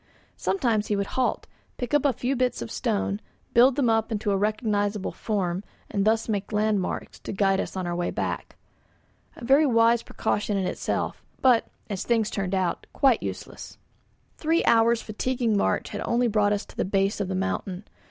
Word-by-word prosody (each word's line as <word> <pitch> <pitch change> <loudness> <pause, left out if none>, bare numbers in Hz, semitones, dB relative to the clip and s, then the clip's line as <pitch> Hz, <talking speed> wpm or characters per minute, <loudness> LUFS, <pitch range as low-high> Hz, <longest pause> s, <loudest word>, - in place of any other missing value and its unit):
Sometimes 230 - 0
he 210 - +1
would 200 0 0
halt, 260 -1 0 0.3
pick 245 +1 -4
up 295 -1 +3
a 280 - +5
few 250 +3 -1
bits 250 - 0
of 115 - -8
stone, 95 0 -1 0.3
build 245 +2 +6
them 275 -4 +2
up 225 0 +2
into 210 -1 -1
a - - +2
recognisable 205 -1 0
form, 190 -4 -2 0.3
and 200 -1 0
thus 220 +1 +2
made 205 -2 -2
landmarks 210 -2 -1
to - - -6
guide 195 -1 +2
us - - -4
in 185 -1 -2
our 175 0 -2
way 175 0 -1
back. - - -3 0.8
A 235 - -9
very 280 +4 +5
wise 230 -1 +4
precaution 210 -2 -1
in 190 - 0
itself, - - -2 0.2
but, 250 -3 +4 0.2
as 200 -4 -3
things 225 -3 +1
turned 195 -1 -1
out, 185 -2 -1
quite 265 -5 +3
useless. - - -7 0.6
Three 325 +2 +1
hours' 230 0 +4
fatiguing 235 +1 -1
march 200 - +1
had - - -5
only 240 +1 +2
brought 210 -2 +2
us 205 +1 -2
to - - -16
the - - 0
base 195 +1 0
of 195 - -1
the 190 - -2
mountain. 190 0 -2
215 Hz, 185 wpm, -26 LUFS, 195-235 Hz, 0.8 s, build